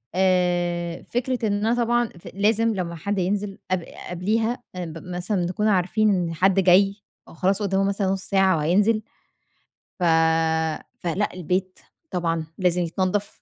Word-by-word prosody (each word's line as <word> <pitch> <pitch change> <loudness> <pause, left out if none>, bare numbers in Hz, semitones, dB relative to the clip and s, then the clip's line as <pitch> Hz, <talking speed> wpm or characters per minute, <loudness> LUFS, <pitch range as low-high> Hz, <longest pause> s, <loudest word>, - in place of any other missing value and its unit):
آآ، 175 -2 +1
فكرة 245 -1 -1
إن 205 - +1
أنا 230 - +2
طبعًا 240 -1 +1
ف - - -13
لازم 220 +3 +2
لمّا 170 -3 -3
حد 200 +5 -3
ينزل 195 +2 -1
قب 185 -2 +1 0.3
قبليها 220 +7 -1
آآ 180 -1 -4
ب 160 0 -8
مثلًا 180 +1 -2
نكون 210 +5 -1
عارفين 210 +2 +2
إن 175 -4 0
حد 190 +3 +3
جاي، 195 +2 +5 0.3
أو - - -14
خلاص 190 +5 0
قُدّامُه 195 -1 +1
مثلًا 200 0 0
نُص 190 0 -1
ساعة 190 -3 +3
وهينزل. 205 +8 +2 1.0
ف - - -2 1.0
فلأ 180 +4 -1
البيت 185 +2 -2 0.3
طبعًا 165 -2 -1
لازم 180 -1 +1
يتنَضّف، 185 +4 -2
190 Hz, 150 wpm, -24 LUFS, 175-205 Hz, 1.0 s, جاي